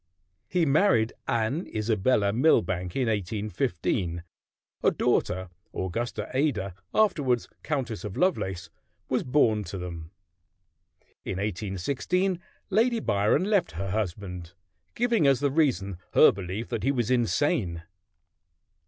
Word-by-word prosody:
He 175 -2 +2
married 140 - +3
Anne 120 - 0
Isabella 105 -1 +1
Milbanke 95 - +2
in 130 -3 +1
1815. 100 -4 -1 0.6
A - - +5
daughter, 95 +1 0 0.3
Augusta 115 +6 -3
Ada, 120 - 0 0.2
afterward 145 - +2 0.2
Countess 130 -8 -3
of 105 -2 -6
Lovelace, 95 - 0 0.4
was - - +1
born 115 -6 +2
to 90 +3 -6
them. 85 -3 -6 1.1
In - - -3
1816 110 - -1 0.3
Lady 230 +4 +3
Byron 105 - +2
left 200 - +1
her 95 +3 -4
husband, 90 -4 -4 0.4
giving 235 -9 +2
as 135 -2 +4
the 140 0 +1
reason 100 - +1
her - - +8
belief 95 +4 -5
that 110 - -2
he 135 +7 +2
was 120 -3 0
insane. 120 - +1
110 Hz, 115 wpm, -27 LUFS, 95-145 Hz, 1.1 s, her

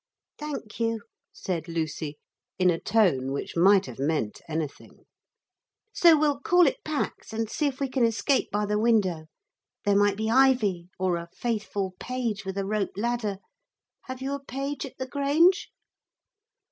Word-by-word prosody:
'Thank 290 -8 -6
you,' 230 -2 -1 0.3
said 170 -3 -4
Lucy, 155 -2 -3 0.4
in 180 -1 +4
a 165 - -1
tone 175 -12 +2
which 140 - -4
might 190 +3 +5
have 125 -2 -9
meant 140 -7 -1
anything. 155 -2 -5 0.9
'So 335 -3 +6
we'll 290 -2 +1
call 355 +4 +4
it 275 - 0
Pax 305 -6 -3
and 225 0 -2
see 300 - 0
if 270 -2 -4
we 275 - 0
can 260 -1 0
escape 230 +4 +1
by 210 +1 0
the 210 0 0
window. 195 -8 +2 0.6
There 205 -1 +3
might 205 0 +3
be 220 +1 -1
ivy 230 -9 +3
or 185 -2 +1
a 170 0 -7
faithful 205 -5 -2
page 235 -6 -3
with 190 0 -4
a 195 - -1
rope 200 -2 -2
ladder. 225 -2 -1 0.7
Have 260 0 -6
you 275 +1 -2
a 280 0 -5
page 275 +1 -4
at - - -15
the 260 - -3
Grange?' 290 +7 +3
215 Hz, 160 wpm, -27 LUFS, 185-265 Hz, 0.9 s, So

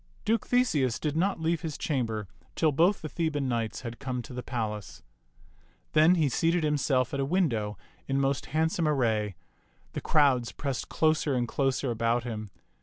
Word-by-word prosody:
Duke 225 0 +1
Theseus 150 - +2
did 150 +2 -2
not 190 +4 +1
leave 165 0 0
his 155 -3 -4
chamber 115 -8 -2 0.3
till 160 -2 +3
both 170 +8 +3
the - - -2
Theban 150 -4 -1
knights 115 -4 -2
had 120 -2 -7
come 130 -3 -3
to 125 - -10
the 125 - -4
palace. 110 -5 -4 0.9
Then 155 +4 +6
he 160 -4 +2
seated 165 +5 +1
himself 140 -4 +1
at 140 - -1
a - - +2
window 130 - 0 0.3
in 135 0 +1
most 135 -1 0
handsome 160 +1 +1
ar 150 - +2
ray. 110 -6 0 0.6
The - - -3
crowds 135 -6 +3
pressed 140 -3 -3
closer 155 -3 +2
and 120 -1 0
closer 135 0 0
about 115 +1 +1
him. 110 -3 -5
135 Hz, 175 wpm, -28 LUFS, 120-160 Hz, 0.9 s, Then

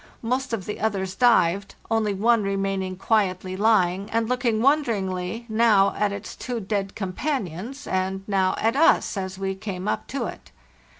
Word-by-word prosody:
Most 255 +3 -1
of 225 -5 -3
the 210 - -5
others 195 -3 -1
dived, 195 -5 +3 0.2
only 220 -2 +2
one 225 +3 +3
re 195 -1 -1
maining 195 -1 -2
quietly 190 -3 0
lying, 200 -2 +2
and 230 0 0
looking 245 -3 0
wonderingly, 225 -6 0
now 215 -3 +4
at 210 -1 +1
its 200 +1 -7
two 245 -2 -4
dead 195 -1 -3
companions, 215 - -4
and 190 +1 -1
now 190 -2 +1
at 225 +3 +1
us 315 -4 +4
as 190 -1 -4
we 195 0 -2
came 190 -1 -5
up - - -2
to 265 -3 -3
it. - - -8
200 Hz, 165 wpm, -24 LUFS, 190-230 Hz, 0.2 s, now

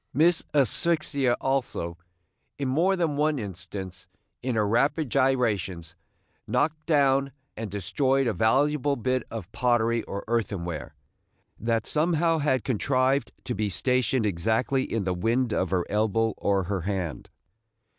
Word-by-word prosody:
Miss 165 +4 +4
Asphyxia 140 - +1
also, 130 -11 -1 0.6
in 140 - -2
more 170 +9 +2
than 165 -5 0
one 150 0 +2
instance, 95 -3 -6 0.3
in 125 -2 -2
her 105 -2 +2
rapid 135 +5 +1
gyrations, 105 - 0 0.5
knocked 155 0 0
down 140 -3 +3 0.2
and 110 -1 -5
destroyed 130 - +1
a 115 - +1
valuable 140 +6 +2
bit 130 +1 0
of 110 -6 -7
pottery 120 -2 +1
or 100 - -5
earthen 105 -6 -1
ware, 80 -4 -6 0.6
that 115 0 0
somehow 165 +1 +2
had 130 -5 +1
contrived 130 +2 +1
to 125 - -3
be 110 -3 -1
stationed 125 +3 +1
exactly 110 +8 0
in 115 -3 0
the 90 -1 0
wind 115 +6 0
of 95 - 0
her 90 -2 0
elbow 110 +2 +1
or 100 -1 +1
her 95 +1 -2
hand. 90 -4 -3
120 Hz, 135 wpm, -26 LUFS, 100-140 Hz, 0.6 s, Miss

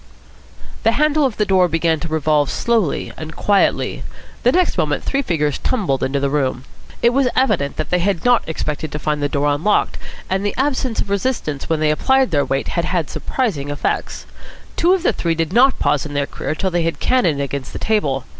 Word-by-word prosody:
The 225 - +3
handle 300 0 +3
of 235 - -7
the 210 - +2
door 185 -2 +3
began 165 -1 +1
to 165 - -5
revolve 155 -2 +1
slowly 225 -9 0
and 155 0 -8
quietly. 200 -1 +1 0.4
The 245 - +4
next 365 +3 +2
moment - - 0
three 275 - 0
figures 150 - -1
tumbled 185 - -1
into 140 +1 0
the 140 0 -1
room. 130 -3 -1 0.4
It 235 - +5
was 265 +1 +2
evident 190 - +1
that 155 - -3
they 180 - +3
had 175 -2 -1
not 245 -1 +5
expected 155 -1 -3
to - - -2
find 150 -1 -2
the 145 - 0
door 145 +1 +1
unlocked, 185 +9 +1 0.3
and 190 +1 -1
the 205 - -1
absence 260 -3 0
of 200 - -5
resistance 200 - -2
when 160 -1 0
they 155 -1 +3
applied 265 +11 +2
their 145 -3 +2
weight 135 - -2
had 170 -1 -1
had 175 -5 -1
surprising 180 - -2
effects. 145 0 -3 0.5
Two 350 +2 +3
of 365 - -4
the - - +2
three 165 -1 -1
did 165 +1 -2
not 260 +4 +5
pause 145 - +1
in 145 -1 -7
their 140 0 +1
career 155 - -4
till 190 +3 -1
they 170 -1 +1
cannoned 180 - +1
against 140 -1 -4
the - - -6
table. 145 - 0
170 Hz, 205 wpm, -19 LUFS, 145-235 Hz, 0.5 s, It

